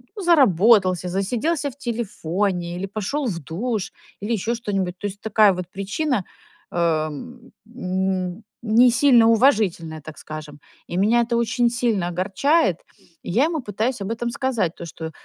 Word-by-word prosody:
ну, 405 - -6
заработался, 205 - +4
засиделся 250 - -1
в 265 - -20
телефоне 195 - -2
или 195 - -3
пошёл 215 +8 -3
в 170 -6 -3
душ, 200 - -3 0.3
или 210 +3 -3
ещё 230 +3 -1
что-нибудь. 195 -5 -3
То 205 - -3
есть 205 +1 -9
такая 215 -2 +4
вот 180 -1 -6
причина, 200 - -2 0.5
э, - - -5
м, 185 - -3 0.2
не 235 +2 +5
сильно 245 -3 +5
уважительная, 205 - +2
так 155 +1 -11
скажем. 155 -1 -9 0.3
И 175 - -4
меня 220 +5 +3
это 235 0 0
очень 235 +1 +1
сильно 230 -7 0
огорчает, 190 - +1 0.5
и - - -7
я 250 - +3
ему 320 -3 -2
пытаюсь 220 +2 -2
об 195 +3 -3
этом 235 +1 -2
сказать, 235 -11 -1
то, 170 - -8
что 160 0 -7
205 Hz, 155 wpm, -22 LUFS, 180-240 Hz, 0.5 s, не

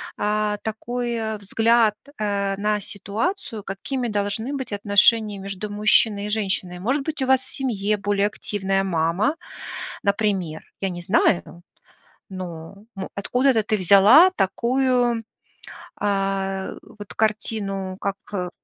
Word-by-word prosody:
а, 210 0 0
такой 225 0 -3
взгляд, 225 +2 +3 0.2
э, 200 -2 0
на 210 +1 0
ситуацию, 215 - -4
какими 240 +6 -3
должны 210 +5 -2
быть 265 -4 -5
отношения 205 +1 +3
между 195 +1 -5
мужчиной 210 0 +3
и - - -5
женщиной. 195 -4 -1
Может 265 +9 0
быть, 300 -1 -3
у - - +1
вас 265 0 +4
в - - -3
семье 215 -6 -1
более 205 0 +1
активная 195 -2 -1
мама, 180 - +1 0.7
например. 200 -6 0 0.2
Я 195 - 0
не 175 -1 -6
знаю, 175 -2 +1 0.7
но, 175 -2 -7 0.2
м, 190 - -5
откуда-то 250 +3 +2
ты 215 - 0
взяла 205 - +7
такую, 245 +2 +1 0.8
а, 195 -1 -1 0.3
вот 205 - -8
картину, 200 -3 -1
как, 200 0 -1 0.2
э, 180 -3 -2
205 Hz, 120 wpm, -23 LUFS, 195-225 Hz, 0.8 s, взяла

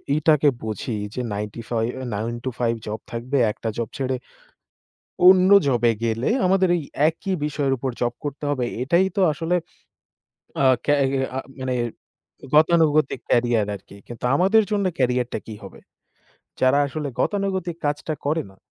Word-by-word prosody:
ই - - +1
টাকে 150 -2 +5 0.2
বুঝি 110 +2 -3 0.2
যে, 125 - -3
নাইনটিফাইভ 115 +3 -3 0.2
৯টা-৫টা 120 +2 -2
জব 105 +1 -4
থাকবে। 125 +4 -2
একটা 115 - -5
জব 115 -2 -2
ছেড়ে, 130 -1 -1 1.1
অন্য 185 0 +7 0.2
জবে 120 -3 +3
গেলে, 115 +2 0 0.2
আমাদের 190 0 +3
এই 165 - -3 0.3
একই 185 +4 -3
বিষয়ের 145 -2 -1
উপর 130 +1 -3
জব 120 0 +1
করতে 145 0 -5
হবে। 130 -4 0 0.2
এটাই 170 +8 +3
তো 200 - +2
আসলে, 165 +3 -2 1.1
আ - - +3 0.2
ক্যা 145 - +3 0.2
হি 135 - -1 0.2
আ - - 0 0.2
মানে 130 -1 -1 0.8
গতানুগতিক 155 -4 +4
ক্যারিয়ার 120 -3 +2
আরকি। 100 +1 -12
কিন্তু, 120 0 -9
আমাদের 195 +7 +4
জন্য 200 -2 +1
ক্যারিয়ার 125 -1 +1
টা - - -1
কি 110 - -7
হবে? - - -11 0.8
যারা 130 +2 +4
আসলে, 145 +1 -4
গতানুগতিক 190 -4 -1
কাজটা 150 +2 -1
করে 160 +2 +1
না। 95 - -20
135 Hz, 150 wpm, -23 LUFS, 120-160 Hz, 1.1 s, অন্য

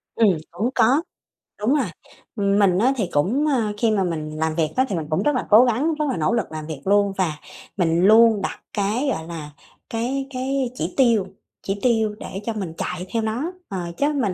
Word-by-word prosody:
Ừm, 225 -3 +5 0.2
cũng 210 +9 -1
có. 265 +8 +4 0.6
Đúng 220 +6 +2
rồi. 280 -5 +1 0.5
Mình 200 -3 +3
á 255 +5 +3
thì 195 -7 -1
cũng, 210 - +1
ơ, 230 -8 +1
khi 225 0 +2
mà 200 -3 +2
mình 160 -3 -3
làm 160 0 -1
việc 160 -2 +1
á, 260 - +3
thì 195 - -1
mình 160 -3 -3
cũng 155 - 0
rất 295 -1 +2
là 250 - -1
cố 225 +4 +8
gắng, 265 +8 +1
rất 300 0 -1
là - - -1
nỗ 160 +8 +1
lực 230 -7 -1
làm 155 -1 -6
việc 150 -4 -6
luôn 200 0 +3
và 165 -6 0 0.4
mình 170 0 +2
luôn 220 0 +6
đặt - - -4
cái, 215 +7 0
gọi 160 -8 -3
là, 155 -3 -7 0.4
cái 250 +4 -2
cái 265 0 -1
chỉ 175 -5 -3
tiêu 230 -7 +3 0.4
chỉ 195 +1 -3
tiêu 220 -4 +2
để 195 - -6
cho 230 - -1
mình 190 -7 -4
chạy 180 0 -4
theo 230 - +1
nó, 240 +10 -2 0.2
ờ, 185 -3 -4
chứ 290 +2 +1
mình 235 -10 0
210 Hz, 220 wpm, -22 LUFS, 180-250 Hz, 0.6 s, cố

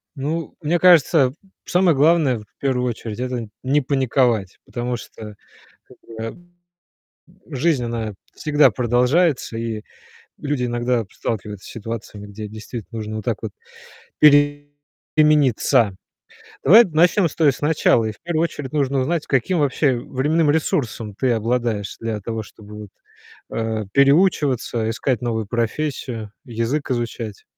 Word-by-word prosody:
Ну, 155 +4 -4
мне 170 +3 +1
кажется, 160 -6 +5 0.3
самое 175 -3 +3
главное, 145 -4 +3
в 105 - -13
первую 125 -2 0
очередь- 115 -1 -6
это 125 -2 -3 0.2
не 145 +3 +2
паниковать, 125 -7 +1
потому 120 0 -3
что, 105 -2 -10 0.5
как - - -17
бы, 115 -1 -7
м, 175 +9 -10 0.9
жизнь, 140 -1 +1
она 115 -2 -3 0.2
всегда 150 -1 +4
продолжается, 125 +3 +1
и 115 -2 -4 0.5
люди 145 -3 -2
иногда 120 -1 0
сталкиваются 105 -3 -5
с - - -10
ситуациями, 110 -2 -7
где 105 +1 -7
действительно 110 +1 -8
нужно 110 0 -5
вот 110 - -7
так 115 -3 0
вот 110 - -4 0.7
перемениться. 145 - +3 0.7
Давай 220 +6 +8
начнем 175 +3 +3
с 150 - -10
той 155 -4 +4
с - - -11
начала, 150 -6 +3
и 110 - -2
в 105 - -18
первую 165 -1 0
очередь 145 -5 -4
нужно 140 -2 +1
узнать, 155 +5 -1
каким 140 +7 +1
вообще 140 -2 +2
временным 145 +4 +1
ресурсом 120 -8 -1
ты 130 +3 +1
обладаешь 115 -3 -1
для 110 -2 -3
того, 110 +1 -4
чтобы 105 0 -14
вот, 105 - -10 0.6
э, 110 -1 -2
переучиваться, 140 -6 +2
искать 120 +1 -1
новую 110 -3 -2
профессию, 120 -2 -3
язык 120 +5 -2
изучать. 115 -4 -4
125 Hz, 135 wpm, -21 LUFS, 115-150 Hz, 0.9 s, Давай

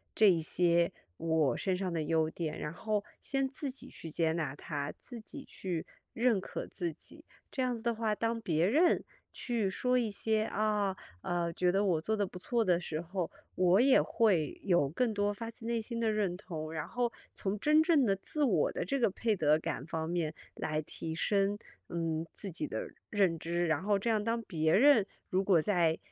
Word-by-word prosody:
这 215 - +6
一 175 -4 +5
些 170 +1 +2 0.3
我 160 -6 +2
身 190 -2 0
上 185 -2 -2
的 165 - 0
优 160 +1 +2
点， 160 -1 -4
然 150 - -4
后 210 +1 -1 0.2
先 270 -1 0
自 270 +1 -4
己 265 0 -11
去 165 - -7
接 160 0 +1
纳 155 -5 -2
它， 145 -1 -4
自 240 -3 -8
己 275 +5 -9
去 175 -4 -4 0.3
认 230 -4 +2
可 - - -5
自 175 -3 -3
己。 150 - -13 0.3
这 265 - -2
样 250 -2 0
子 225 - -11
的 235 -1 +1
话， 220 -1 0
当 230 +1 -1
别 165 -4 +2
人 320 - +4 0.3
去 230 -6 -1
说 250 +5 +1
一 225 -3 0
些， 215 +1 +1
啊， 210 -3 0 0.2
呃， 170 -1 -1
觉 180 +1 +2
得 200 +2 +2
我 170 -5 +2
做 220 +6 -1
得 205 - +1
不 180 - -9
错 230 +4 0
的 180 -3 +4
时 155 -2 -3
候， 175 0 -3 0.2
我 185 +1 +4
也 270 0 +6
会 190 - +1
有 175 -8 +3
更 225 - 0
多 205 0 +1
发 230 +2 -6
自 230 0 -11
内 235 0 0
心 230 +1 -4
的 225 -1 +2
认 200 -4 0
同， 160 -5 -6
然 155 -2 -3
后 240 -1 -1 0.2
从 200 +1 -2
真 305 +7 +4
正 315 -5 +4
的 200 - +3
自 295 +9 -2
我 195 - +3
的 - - -2
这 275 +9 -1
个 230 - +3
配 215 +2 0
得 155 -1 +4
感 145 -3 -4
方 160 -1 -3
面 165 -3 -1 0.2
来 155 0 -1
提 160 +1 -6
升， 200 +3 +1 0.3
嗯， 165 -1 -2
自 195 - -6
己 295 - -3
的 - - -4 0.2
认 190 -6 +2
知。 170 +2 -1
然 160 0 +1
后 205 0 +2
这 230 +4 -1
样 215 -2 +2
当 230 +2 -1
别 160 -7 +1
人， 255 -2 +6 0.2
如 185 - +2
果 180 -5 +4
在 170 -4 +2
195 Hz, 225 characters per minute, -32 LUFS, 165-225 Hz, 0.3 s, 这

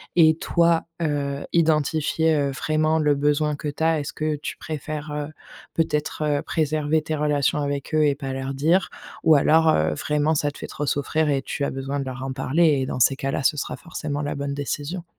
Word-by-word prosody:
Et 160 -2 +6
toi, 170 0 +2 0.2
heu, 145 -3 -1
identifier 160 0 +2
heu, 140 -1 +1
vraiment 155 +3 +1
le 150 -2 +3
besoin 150 +1 +1
que 150 - -6
tu 145 +2 -3
as. 160 -1 +3
Est-ce 145 - -5
que 155 -1 -1
tu 150 - -6
préfères, 155 -1 -5
heu, 150 0 -3 0.5
peut-être, 155 -1 -1
heu, 145 -1 +1
préserver 155 0 0
tes 155 - -2
relations 150 -1 +1
avec 140 0 -3
eux 155 0 +4
et 145 -1 +2
pas 135 -2 -5
leur 135 +1 -4
dire? 165 +7 +2 0.3
Ou 160 -1 +6
alors, 160 +3 +4
heu, 80 - +2
vraiment 150 - 0
ça 145 -1 +1
te 145 - -11
fait - - -7
trop 145 0 -4
souffrir 155 +2 0
et 140 -1 0
tu 140 - -4
as - - +1
besoin 135 +1 -3
de 135 - -3
leur 130 0 -6
en 135 0 -3
parler? 145 +5 +1 0.2
Et 130 - -1
dans - - -3
ces 135 +3 +4
cas-là, 135 0 -2
ce 150 - +2
sera 140 - -3
forcément 145 +1 -5
la 145 - -2
bonne 140 0 -3
décision. 145 +5 -4
150 Hz, 215 wpm, -23 LUFS, 140-155 Hz, 0.5 s, Et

